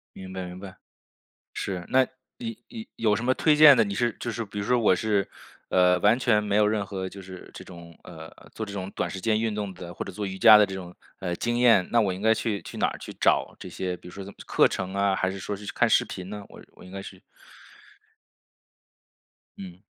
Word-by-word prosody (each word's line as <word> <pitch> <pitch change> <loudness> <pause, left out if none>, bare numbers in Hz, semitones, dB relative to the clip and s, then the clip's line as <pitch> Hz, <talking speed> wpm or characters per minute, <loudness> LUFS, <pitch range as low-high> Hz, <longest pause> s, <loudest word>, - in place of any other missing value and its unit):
明 95 0 -9
白 95 -1 -5
明 90 +1 -9
白， 95 -1 -10 0.8
是。 90 -3 -4
那 130 0 +4 0.3
你 230 -2 -6
你 225 -2 -8
有 110 -2 +2
什 110 - -4
么 130 +1 +2
推 155 +3 +3
荐 150 -2 +9
的？ - - +4
你 100 -2 -4
是 120 +2 0
就 120 - -3
是 115 +1 -4
比 105 0 -7
如 100 - -3
说 125 +2 +2
我 105 -5 +4
是 100 0 0 0.4
呃， 90 0 +4
完 105 +5 +4
全 115 -4 +2
没 105 -1 -1
有 105 0 +4
任 105 -1 0
何 95 -1 -5
就 100 - -11
是 95 -1 -11
这 - - -9
种， 85 -2 -13
呃， 80 -1 -10 0.2
做 110 - -5
这 100 - -9
种 95 -1 -5
短 - - -3
时 95 - -6
间 110 +2 +1
运 110 -1 -1
动 100 -2 -4
的 90 -1 -9
或 - - -6
者 - - -7
做 105 +2 -5
瑜 95 -1 -5
伽 110 +2 +9
的 105 - +5
这 95 - -8
种， 90 -2 -9 0.2
呃， 90 -2 -3
经 120 +6 -1
验， 115 -7 +5
那 120 - +4
我 100 -3 0
应 95 - -8
该 110 +1 +4
去 110 -2 -2
去 - - -10
哪 - - +2
儿 - - -5
去 - - -8
找 - - +1
这 - - -9
些， 90 -1 -4
比 - - -14
如 90 - -11
说 100 - -7
这 95 - -9
什 - - -10
么 - - -23
课 - - +4
程 95 0 -4
啊， 100 0 +1
还 95 - 0
是 95 - -7
说 100 +2 -4
是 105 +1 -11
就 - - -4
看 - - +3
视 - - +4
频 95 0 -8
呢？ 105 0 -7
我 - - -13
我 - - -16
应 90 - -13
该 95 0 -6
是 95 -1 -11 2.4
嗯。 90 -2 -10
100 Hz, 275 characters per minute, -26 LUFS, 95-110 Hz, 2.4 s, 荐